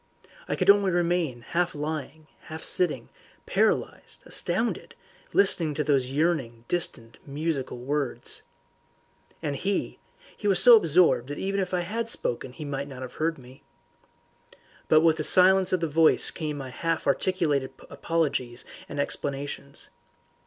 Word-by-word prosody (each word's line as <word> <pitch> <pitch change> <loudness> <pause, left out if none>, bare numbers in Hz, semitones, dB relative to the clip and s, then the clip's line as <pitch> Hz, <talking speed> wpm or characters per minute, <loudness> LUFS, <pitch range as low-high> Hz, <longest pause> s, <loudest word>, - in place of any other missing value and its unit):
I - - -1
could 190 +1 +6
only 200 -1 +2
remain 175 -7 0
half 175 +7 -2
lying, 155 0 -5 0.2
half 160 +1 -8
sitting, 150 -10 +2 0.4
paralysed, - - -1
astounded, - - -2 0.4
listening 170 -6 +1
to 150 - -1
those 135 -4 +1
yearning 135 -6 -1
distant 120 -9 -2
musical 145 -2 -3
words. 140 +1 -3 1.0
And 145 -1 -2
he 195 +7 -3 0.4
he 205 - -4
was 195 -3 +3
so 245 - +9
absorbed 165 - +3
that 145 - -6
even 195 +1 -2
if 185 -2 -2
I 180 -1 0
had 225 +6 -4
spoken 125 - -2
he 155 +2 -8
might 140 0 -4
not 130 -2 -8
have 125 - -8
heard 160 +1 0
me. 130 0 -15 1.3
But 155 - +5
with 160 -1 +3
the 155 - -2
silence 185 +2 +5
of 185 - +1
the 165 - 0
voice 160 +1 +6
came 150 -3 -5
my 135 -2 -7
half 165 +4 -2
articulated 145 -3 0 0.2
apologies 140 -7 -2 0.2
and 145 - -6
explanations. 140 0 -4
155 Hz, 145 wpm, -26 LUFS, 140-175 Hz, 1.3 s, so